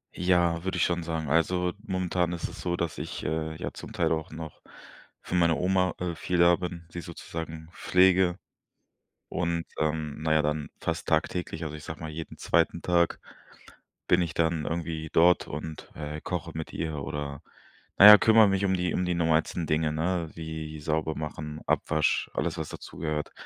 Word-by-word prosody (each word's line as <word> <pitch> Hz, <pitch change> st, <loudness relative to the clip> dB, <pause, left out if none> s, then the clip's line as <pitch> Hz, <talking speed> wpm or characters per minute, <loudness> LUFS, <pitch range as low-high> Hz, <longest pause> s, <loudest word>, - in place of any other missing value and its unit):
Ja, 85 Hz, -2 st, +2 dB
würde 95 Hz, -, -2 dB
ich -, -, +3 dB
schon 85 Hz, -1 st, -1 dB
sagen. 80 Hz, -2 st, -3 dB
Also, 90 Hz, +3 st, +2 dB
momentan 90 Hz, -2 st, 0 dB
ist 85 Hz, -, -3 dB
es -, -, -10 dB
so, 85 Hz, -1 st, -1 dB
dass 85 Hz, -2 st, -3 dB
ich, 75 Hz, +2 st, -5 dB
äh, 80 Hz, 0 st, -2 dB
ja -, -, -4 dB
zum -, -, -9 dB
Teil -, -, +1 dB
auch 80 Hz, -1 st, -2 dB
noch 80 Hz, -1 st, -8 dB, 0.6 s
für -, -, -4 dB
meine 85 Hz, -2 st, +4 dB
Oma, 90 Hz, +3 st, +1 dB
äh, 90 Hz, -2 st, -2 dB
viel 90 Hz, +3 st, -2 dB
da 85 Hz, 0 st, +7 dB
bin, 85 Hz, -1 st, -6 dB
sie 85 Hz, -, -5 dB
sozusagen 80 Hz, -1 st, -7 dB
pflege. 90 Hz, 0 st, +3 dB, 0.9 s
Und, 85 Hz, -1 st, -1 dB
ähm 80 Hz, -1 st, -1 dB
na 80 Hz, 0 st, 0 dB
ja, 80 Hz, -, +4 dB
dann 75 Hz, 0 st, -1 dB
fast -, -, -3 dB
tagtäglich 85 Hz, -2 st, -1 dB
also, 75 Hz, -1 st, -5 dB
ich 75 Hz, -, -11 dB
sage 80 Hz, -, -7 dB
mal, 80 Hz, -1 st, -5 dB
jeden 80 Hz, +1 st, -7 dB
2. 85 Hz, +1 st, +1 dB
Tag 85 Hz, -1 st, +2 dB, 0.9 s
bin 90 Hz, -, +4 dB
ich 85 Hz, -, -4 dB
dann 80 Hz, -2 st, 0 dB
irgendwie 80 Hz, -1 st, -3 dB
dort 90 Hz, +2 st, +5 dB
und, 75 Hz, +1 st, -7 dB
äh, 75 Hz, 0 st, -5 dB
koche -, -, -4 dB
mit 80 Hz, 0 st, -5 dB
ihr 75 Hz, -3 st, -3 dB
oder 70 Hz, -1 st, -5 dB, 0.6 s
na 100 Hz, -, +9 dB
ja, 105 Hz, 0 st, +12 dB
kümmere 110 Hz, -1 st, +6 dB
mich 95 Hz, 0 st, +1 dB
um 95 Hz, -, +2 dB
die 90 Hz, -2 st, 0 dB
um 90 Hz, -, +1 dB
die 90 Hz, -, 0 dB
normalsten 80 Hz, 0 st, +1 dB
Dinge, 75 Hz, 0 st, +1 dB
ne, 85 Hz, +2 st, -1 dB
wie 80 Hz, -1 st, -6 dB
sauber 80 Hz, +1 st, -1 dB
machen, 75 Hz, 0 st, -5 dB
Abwasch, 75 Hz, -1 st, +1 dB
alles -, -, -1 dB
was -, -, -3 dB
dazugehört. 75 Hz, -2 st, -5 dB
80 Hz, 180 wpm, -28 LUFS, 80-90 Hz, 0.9 s, ja